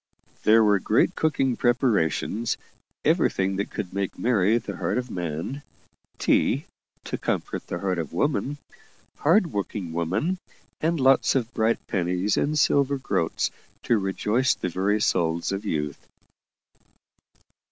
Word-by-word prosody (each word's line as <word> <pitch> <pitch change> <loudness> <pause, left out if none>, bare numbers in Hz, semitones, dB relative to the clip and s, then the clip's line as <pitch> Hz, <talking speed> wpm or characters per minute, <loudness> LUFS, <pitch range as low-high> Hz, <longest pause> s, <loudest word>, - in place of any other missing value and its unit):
There 110 +1 +6
were 105 -2 +4
great - - +2
cooking 135 -5 +1
preparations 115 -3 +1 0.5
everything 95 0 +2
that 100 - -2
could 95 -4 -5
make 100 -1 -2
merry 110 -2 +3
the 120 - -5
heart - - -1
of 125 -2 -3
man 85 - -4 0.6
tea, - - +2 0.4
to - - -4
comfort - - -3
the - - -3
heart 95 -1 -1
of 80 -4 -4
woman, 145 0 0 0.6
hard 170 +2 +3
working 100 -4 -3
woman 100 - -1 0.4
and 165 +1 0
lots 135 +1 +4
of 120 -2 -1
bright 110 0 0
pennies 90 +2 0
and 150 +1 0
silver 140 -1 +3
groats 85 -10 -1 0.3
to 115 - +2
rejoice 105 +6 +1
the 90 - -3
very 100 +4 +1
souls 85 -4 +1
of 100 +2 -3
youth. 75 -4 -3
105 Hz, 130 wpm, -25 LUFS, 90-130 Hz, 0.6 s, There